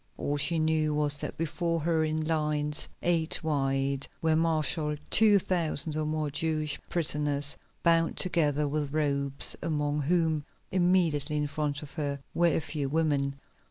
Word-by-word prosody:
All 145 - -2
she 150 +4 +2
knew 155 -1 +1
was 145 -1 +2
that - - -5
before 165 +1 -2
her 160 0 +1
in 155 0 -1
lines 150 -1 -1
eight 165 -3 +2
wide 135 -2 -1
were 160 -1 +1
marshalled 155 -1 +1
two 215 -1 +6
thousand 170 -4 0
or 155 0 -1
more 155 -1 -2
Jewish 155 -1 0
prisoners 145 -3 +1 0.3
bound 165 -1 +2
together 150 -5 +1
with 145 -1 -3
ropes, 140 -2 +1
among 150 -2 -1
whom, 160 0 +1 0.3
immediately 175 -5 +1
in 150 - 0
front 145 0 -3
of 145 - -10
her, 145 -3 -3
were 175 - +3
a 165 - +2
few 145 -3 -3
women. 145 -3 0
155 Hz, 150 wpm, -28 LUFS, 145-165 Hz, 0.3 s, two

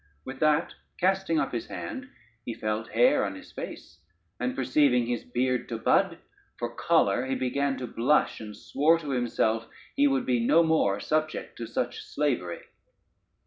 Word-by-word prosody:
With 130 0 -7
that 155 +1 +2 0.2
casting 190 -3 +1
up - - -1
his 120 - -4
hand 265 +1 -6 0.3
he 115 - -5
felt 110 +1 -3
hair 115 +2 +4
on 100 -1 -3
his 95 - -12
face, 85 0 -8 0.4
and 125 +1 -1
perceiving 130 -1 +3
his 120 0 -2
beard 125 0 -1
to 115 - -3
bud, - - +2 0.4
for 120 0 -4
choler 130 -7 +2
he 135 - 0
began 135 +2 0
to 130 - -4
blush, 125 +5 +1
and 105 -1 -8
swore 145 +8 +2
to 150 -4 -5
himself 115 -2 0 0.3
he 145 - +4
would 135 -1 +1
be 120 -2 +1
no 165 +8 +5
more 155 -12 +2
subject 155 +7 -2
to 115 - -4
such 120 +2 -3
slavery. 125 -13 -2
125 Hz, 165 wpm, -27 LUFS, 115-150 Hz, 0.4 s, no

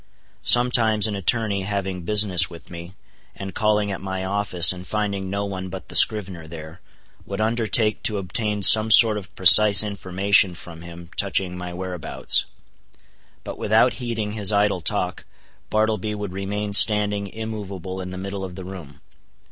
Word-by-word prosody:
Sometimes 115 -4 +4
an 105 -2 -1
attorney 100 0 0
having 95 -2 -5
business 95 -1 +2
with 85 -2 -15
me, 85 +2 -11 0.4
and 95 -1 -9
calling 105 -1 -1
at 95 - -7
my 95 0 -6
office 95 -3 +3
and 90 0 -12
finding 100 -3 -4
no 100 +1 -4
one 95 -2 -7
but - - -10
the - - -8
scrivener 95 -6 +4
there, 80 +2 -12 0.5
would 100 0 -7
undertake 110 -1 -1
to 105 - -1
obtain 105 +2 -4
some 110 +2 +7
sort 110 0 +5
of 100 -3 -10
precise 100 +3 +6
information 100 -2 0
from 85 -1 -12
him 85 0 -13
touching 95 -2 0
my 90 0 -8
whereabouts; 90 -2 -3 1.0
but - - -10
without 110 +4 +1
heeding 115 -3 -5
his 105 -2 +2
idle 100 -3 -1
talk, - - -3 0.5
Bartleby 110 -1 -2
would 105 -3 -8
remain 100 +2 -6
standing 105 -1 +3
immovable 100 -4 -8
in 90 - -8
the 95 - -8
middle 100 +1 -7
of 90 -2 -9
the 95 -1 -10
room. 85 -7 -12
100 Hz, 155 wpm, -20 LUFS, 90-105 Hz, 1.0 s, some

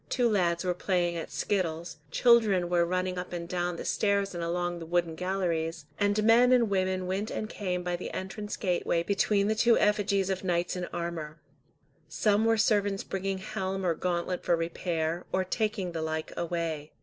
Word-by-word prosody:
Two 245 -2 +2
lads 180 -5 +1
were 180 - +1
playing 175 -1 0
at 165 - -5
skittles, 170 -4 -2
children 215 -7 +4
were 175 -1 +3
running 185 0 -1
up 180 - -6
and 170 -1 -4
down 175 -1 -1
the - - -6
stairs 200 -2 +1
and 170 -1 -4
along 175 +1 -1
the 165 - -7
wooden 170 -1 +1
galleries, 170 -3 -2
and 205 +1 +2
men 235 +3 +6
and 235 -4 +4
women 185 -1 0
went 195 +4 -2
and 215 - -3
came 180 -4 -3
by 175 0 -1
the 175 - -5
entrance 205 +2 -5
gateway 175 -3 0
between 200 +1 +2
the 215 - +2
two 235 +1 +4
effigies 200 -2 +2
of 190 0 -3
knights 175 -1 0
in 180 -1 -3
armour. 165 -3 -5 0.7
Some 210 +6 +2
were 225 0 +3
servants 205 -2 +2
bringing 195 0 -3
helm 190 0 -3
or 170 - +3
gauntlet 175 +1 -2
for 170 - +3
repair, 165 0 -2
or 190 - +1
taking 205 -1 -1
the 165 -1 -4
like 160 0 -3
away. 165 -3 -3
180 Hz, 185 wpm, -29 LUFS, 170-200 Hz, 0.7 s, men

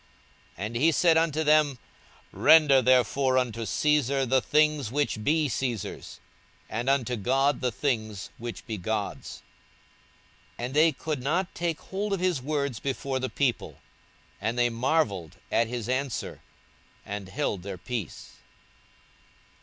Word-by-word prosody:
42:020:025 100 - -3
And 115 +3 -6
he 160 +7 +4
said 165 +1 +4
unto 160 -1 +2
them, 150 -3 +3 0.5
Render 150 -4 +6
therefore 130 +1 +3
unto 115 -3 -1
Caesar 140 0 +1
the 130 +1 +2
things 150 -2 +2
which 140 -6 -1
be 155 +4 +2
Caesar's, 120 -5 -4 0.5
and 120 +4 -2
unto 125 -3 +1
God 135 +6 +1
the 125 -1 0
things 110 -4 -2
which 120 0 -7
be 110 -4 -5
God's. 105 +2 -4 1.1
42:020:026 120 - -3
And 130 - -6
they 155 +2 +5
could 155 -4 -4
not 170 +8 -1
take 170 -2 -2
hold 200 +2 -3
of 195 - -1
his 180 -6 0
words 140 -3 -2
before 135 -1 -2
the 130 0 -2
people: 135 -4 -1 0.6
and 115 +3 -1
they 120 0 +3
marvelled 115 - 0
at 115 - +2
his 120 -2 -4
answer, 130 0 -3 0.6
and 100 -2 -6
held 105 -5 -2
their 95 0 -6
peace. 100 0 -6
130 Hz, 140 wpm, -27 LUFS, 115-150 Hz, 1.1 s, Render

